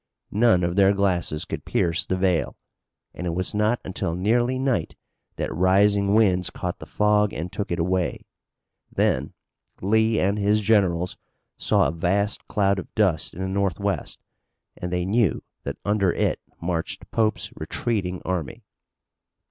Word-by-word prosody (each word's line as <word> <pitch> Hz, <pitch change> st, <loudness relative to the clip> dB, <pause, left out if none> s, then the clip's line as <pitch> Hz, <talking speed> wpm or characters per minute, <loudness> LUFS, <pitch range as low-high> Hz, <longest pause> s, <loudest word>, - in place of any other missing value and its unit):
None 105 Hz, -4 st, +4 dB
of 85 Hz, 0 st, 0 dB
their 100 Hz, 0 st, +5 dB
glasses 90 Hz, -6 st, 0 dB
could -, -, -5 dB
pierce 85 Hz, -1 st, 0 dB
the 95 Hz, -, 0 dB
veil, 90 Hz, -3 st, 0 dB, 0.6 s
and 90 Hz, -, -5 dB
it 85 Hz, -, -2 dB
was 95 Hz, +1 st, -1 dB
not 105 Hz, +3 st, +1 dB
until 85 Hz, -3 st, -2 dB
nearly 120 Hz, +7 st, +1 dB
night 130 Hz, -11 st, -1 dB, 0.4 s
that -, -, -3 dB
rising 100 Hz, +3 st, +3 dB
winds 95 Hz, -5 st, +3 dB
caught 90 Hz, -1 st, -5 dB
the -, -, -10 dB
fog 105 Hz, 0 st, +2 dB
and 85 Hz, +3 st, -5 dB
took 105 Hz, -, -3 dB
it 85 Hz, -, -1 dB
away. 90 Hz, +1 st, -1 dB, 0.7 s
Then -, -, 0 dB, 0.4 s
Lee 110 Hz, +3 st, +2 dB
and 100 Hz, +3 st, +1 dB
his 105 Hz, +1 st, +2 dB
generals 95 Hz, -5 st, +2 dB, 0.4 s
saw -, -, +2 dB
a -, -, -1 dB
vast 95 Hz, +5 st, -1 dB
cloud 100 Hz, -1 st, +1 dB
of -, -, -9 dB
dust 95 Hz, -8 st, +1 dB
in 90 Hz, -, -6 dB
the -, -, -1 dB
northwest 100 Hz, -2 st, -2 dB, 0.5 s
and 90 Hz, -, -5 dB
they 90 Hz, 0 st, 0 dB
knew 105 Hz, -1 st, +1 dB, 0.2 s
that -, -, -4 dB
under 100 Hz, -3 st, +2 dB
it -, -, 0 dB, 0.2 s
marched 85 Hz, -1 st, -3 dB
Pope's 110 Hz, -1 st, 0 dB
retreating 95 Hz, -6 st, -2 dB
army. 90 Hz, -6 st, -3 dB
95 Hz, 150 wpm, -24 LUFS, 90-105 Hz, 0.7 s, their